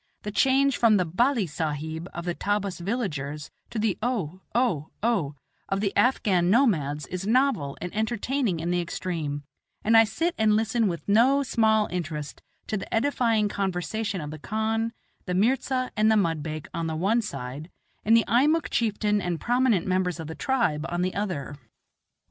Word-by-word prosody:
The 210 - -4
change 270 +5 +3
from 225 -3 +5
the 180 - +1
"balli 230 - +1
sahib" 160 +2 -4
of 170 - -6
the 175 - -1
Tabbas 200 0 -2
villagers 155 - -3 0.2
to - - -6
the 215 -3 0
"O, 190 -8 -2
O, 200 - +1
O" 195 -12 +1 0.3
of 195 - 0
the 200 -1 -1
Afghan 190 -8 +3
nomads 155 - +2
is 185 +5 -5
novel 235 - +1
and 180 +2 -6
entertaining 220 - -1
in 170 +2 -2
the 175 0 +1
extreme, 160 -4 -4 0.4
and 225 +2 +3
I 225 0 +8
sit 330 - -1
and 215 -1 +4
listen 225 +1 +1
with 170 -3 -4
no 250 +7 +4
small 220 -4 +2
interest 155 -4 -4 0.2
to 215 - -2
the 195 - -7
edifying 225 -3 +2
conversation 195 +1 -2
of 150 0 -6
the 155 - -8
khan, 220 +5 -1 0.4
the 180 - -1
mirza, 255 +4 +1
and 215 +1 +4
the - - +4
mudbake 160 -4 -1
on 165 -1 -2
the 160 - -2
one 200 +9 +2
side, 140 - -6 0.3
and 225 +2 +5
the 230 - +2
Eimuck 290 +8 +2
chieftain 210 -2 +1
and 175 -3 -2
prominent 240 -6 +2
members 185 -2 0
of 160 - -5
the 160 - -6
tribe 205 - 0
on 175 +1 -1
the 185 - -1
other. 180 -9 -3
200 Hz, 170 wpm, -26 LUFS, 165-230 Hz, 0.4 s, I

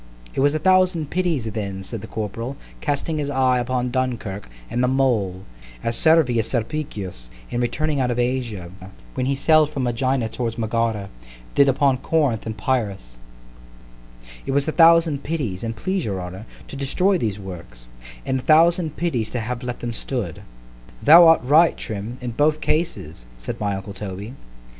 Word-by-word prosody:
It - - -3
was 145 +2 +3
a - - +3
thousand 180 -2 +2
pities 175 -9 0
then, 100 -3 -4
said 110 +2 -6
the 110 - -8
corporal, 115 +5 -5 0.2
casting 150 +2 -1
his 145 -1 -2
eye 130 -2 +2
upon 125 0 -1
Dunkirk, 120 - -3 0.2
and 125 - -1
the - - +3
mole, 115 -9 +1 0.4
as 115 - 0
Servius 130 -9 +3
Sulpicius, 105 - -4 0.2
in 120 - -1
returning 150 +4 -1
out 125 -2 +1
of 120 - -1
Asia 120 -8 -2 0.4
(when 130 - -1
he 140 - +1
sailed 155 +2 +4
from 140 -3 -3
Ægina 125 -1 0
towards 115 -2 -3
Megara), 110 -3 -1 0.4
did 140 -1 +5
upon 135 0 +2
Corinth 135 -7 0
and 110 - -4
Pyreus—— 100 - -2 1.3
—"It 135 - -1
was 140 +1 +1
a - - +1
thousand 165 -3 +5
pities, 140 - -3
an' 115 0 -2
please 185 +8 -2
your 100 -3 -3
honour, 90 +4 -8 0.2
to - - -9
destroy 180 +8 +1
these 105 -6 -1
works——and - - -7
a - - -9
thousand 160 +1 +4
pities 130 -11 -1
to 125 - -3
have 120 +2 -4
let 125 -1 -5
them 120 -1 -3
stood."—— 115 - -4 0.6
——Thou 165 +3 +9
art 165 - +6
right, 155 +6 +5
Trim, 110 +3 -5
in 125 -1 -4
both 150 +5 +2
cases; 80 - -2
said - - -6
my 100 -1 -1
uncle 95 +1 -7
_Toby. 100 +3 -7
125 Hz, 165 wpm, -22 LUFS, 105-145 Hz, 1.3 s, Thou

